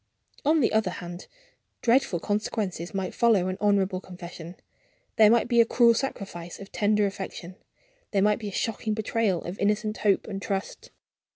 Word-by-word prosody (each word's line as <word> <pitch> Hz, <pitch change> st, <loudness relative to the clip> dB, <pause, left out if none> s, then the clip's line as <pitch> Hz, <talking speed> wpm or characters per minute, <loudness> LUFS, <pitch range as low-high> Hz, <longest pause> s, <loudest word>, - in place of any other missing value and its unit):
On 310 Hz, +2 st, +3 dB
the 235 Hz, -, +2 dB
other 220 Hz, -3 st, +2 dB
hand, 175 Hz, 0 st, -8 dB, 0.6 s
dreadful 235 Hz, -7 st, +3 dB
consequences 205 Hz, -3 st, -2 dB
might 190 Hz, -2 st, -3 dB
follow 210 Hz, -6 st, +3 dB
an 185 Hz, -, -3 dB
honorable 195 Hz, -3 st, +2 dB
confession. 175 Hz, -2 st, -10 dB, 0.6 s
There 215 Hz, -1 st, +7 dB
might 235 Hz, +1 st, +3 dB
be 240 Hz, -1 st, +5 dB
a -, -, +7 dB
cruel 235 Hz, 0 st, +5 dB
sacrifice 195 Hz, -9 st, -5 dB
of 200 Hz, -, -11 dB
tender 210 Hz, 0 st, +2 dB
affection; 190 Hz, -2 st, -6 dB, 0.5 s
there 195 Hz, -2 st, +1 dB
might 210 Hz, +1 st, +3 dB
be 215 Hz, -, -5 dB
a -, -, -4 dB
shocking 215 Hz, +1 st, -2 dB
betrayal 220 Hz, -4 st, 0 dB
of 175 Hz, +3 st, -7 dB
innocent 210 Hz, +1 st, 0 dB
hope 205 Hz, -2 st, +2 dB
and 195 Hz, -2 st, -5 dB
trust." 195 Hz, 0 st, -4 dB
205 Hz, 165 wpm, -26 LUFS, 185-220 Hz, 0.6 s, There